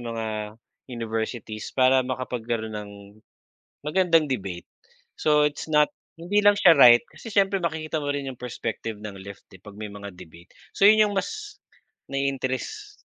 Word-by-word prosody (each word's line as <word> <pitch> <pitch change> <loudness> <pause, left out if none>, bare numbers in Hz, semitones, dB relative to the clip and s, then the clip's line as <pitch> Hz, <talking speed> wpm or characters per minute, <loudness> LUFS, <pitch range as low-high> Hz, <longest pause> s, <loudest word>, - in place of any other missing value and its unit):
mga 115 -1 -4 0.7
universities 110 -1 -4
para 130 0 +5
makapagkaroon 120 -3 -3
ng, 105 -1 -7 0.9
magandang 165 -1 +3
debate. 95 -8 -4 0.5
So, 150 -1 +3
it's 145 - -8
not 150 -1 +4 0.3
hindi 195 +5 +1
lang 205 0 +6
siya 180 -5 +7
right 120 -2 +8
kasi 230 - -11
siyempre 195 0 +3
makikita 160 -2 -2
mo 145 - -3
rin 140 -1 -3
yung 125 - -9
perspective 115 -2 -5
ng 100 -2 -7
left 100 +1 -11 0.2
pag 105 - -10
may 105 -1 -6
mga 100 0 -8
debate. 85 0 -14 0.3
So, 200 - +4
yun 215 0 +6
yung - - -4
mas, 420 - -4 0.5
nai-interest, 135 -2 -3
130 Hz, 145 wpm, -25 LUFS, 110-160 Hz, 0.9 s, right